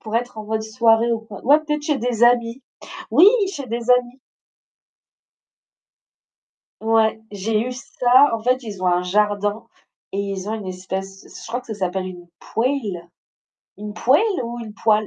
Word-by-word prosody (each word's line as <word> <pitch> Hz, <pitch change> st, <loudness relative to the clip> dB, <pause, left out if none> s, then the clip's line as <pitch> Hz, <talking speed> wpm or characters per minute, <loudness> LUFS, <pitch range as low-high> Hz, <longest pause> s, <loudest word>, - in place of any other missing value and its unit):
pour 220 Hz, 0 st, -7 dB
être 240 Hz, -1 st, -3 dB
en 215 Hz, -, -6 dB
mode 220 Hz, +1 st, -2 dB
soirée, 225 Hz, +1 st, +2 dB
ou 230 Hz, -, -1 dB
quoi. 215 Hz, -3 st, -12 dB
Ouais, 285 Hz, +5 st, +6 dB
peut-être 300 Hz, -1 st, -3 dB
chez 295 Hz, -2 st, 0 dB
des 240 Hz, -2 st, -2 dB
amis. 240 Hz, +1 st, +3 dB, 0.5 s
Oui! 345 Hz, -, +7 dB, 0.3 s
Chez 280 Hz, -7 st, -6 dB
des 235 Hz, +1 st, -3 dB
amis. 250 Hz, +1 st, +2 dB, 2.6 s
Ouais, 220 Hz, 0 st, +2 dB
j'ai 210 Hz, +2 st, -1 dB
eu 250 Hz, +2 st, -3 dB
ça. 250 Hz, +2 st, +3 dB
En 225 Hz, -, -7 dB
fait, 255 Hz, +3 st, +1 dB
ils 205 Hz, -4 st, -8 dB
ont 185 Hz, -, +2 dB
un 180 Hz, 0 st, +2 dB
jardin 205 Hz, +3 st, 0 dB, 0.5 s
et 200 Hz, -, -3 dB
ils 200 Hz, 0 st, -4 dB
ont 220 Hz, -, -2 dB
une 210 Hz, -4 st, -5 dB
espèce, 190 Hz, +1 st, -6 dB, 0.2 s
je -, -, -10 dB
crois 245 Hz, +2 st, -3 dB
que -, -, -23 dB
ça 220 Hz, -, -4 dB
s'appelle 185 Hz, -1 st, -2 dB
une 175 Hz, -1 st, -10 dB
poêle, 225 Hz, -9 st, -2 dB, 0.7 s
une 210 Hz, +1 st, -7 dB
poêle 300 Hz, -, +2 dB
ou 235 Hz, +1 st, -6 dB
une 220 Hz, -2 st, -8 dB
poêle? 215 Hz, -1 st, +2 dB
225 Hz, 170 wpm, -21 LUFS, 205-245 Hz, 2.6 s, Oui